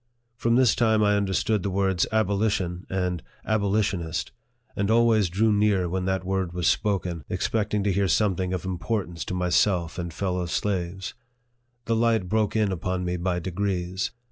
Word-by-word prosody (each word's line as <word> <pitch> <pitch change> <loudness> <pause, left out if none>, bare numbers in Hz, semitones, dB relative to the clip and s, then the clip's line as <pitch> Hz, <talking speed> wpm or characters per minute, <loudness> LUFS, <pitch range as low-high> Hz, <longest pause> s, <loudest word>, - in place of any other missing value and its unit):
From 115 -1 +1
this 125 -4 +5
time 110 -2 +3
I 105 0 +3
understood 100 +1 +1
the 100 - -2
words 95 -2 +1
abo 110 -2 +2
lition 95 -4 -1
and 90 -3 -1 0.2
abolitionist, 100 -6 0 0.4
and 100 +1 0
always 110 -4 +4
drew 105 +5 +2
near 100 -3 +2
when 90 +1 -2
that 95 0 0
word 95 -2 -1
was 90 -1 -2
spoken, 90 -6 0
expecting 105 -2 0
to 100 - +2
hear 100 +1 +1
something 95 0 +1
of 90 -2 -3
importance 90 -1 -3
to 90 - -4
myself 90 -1 +1
and 85 -1 -4
fellow 90 0 -2
slaves. 95 0 -2 0.7
The 115 - +1
light 115 -4 +2
broke 110 +2 0
in 105 -3 +2
upon 90 0 -2
me 90 0 -1
by 90 0 -1
degrees. 95 0 -2
95 Hz, 165 wpm, -25 LUFS, 90-105 Hz, 0.7 s, this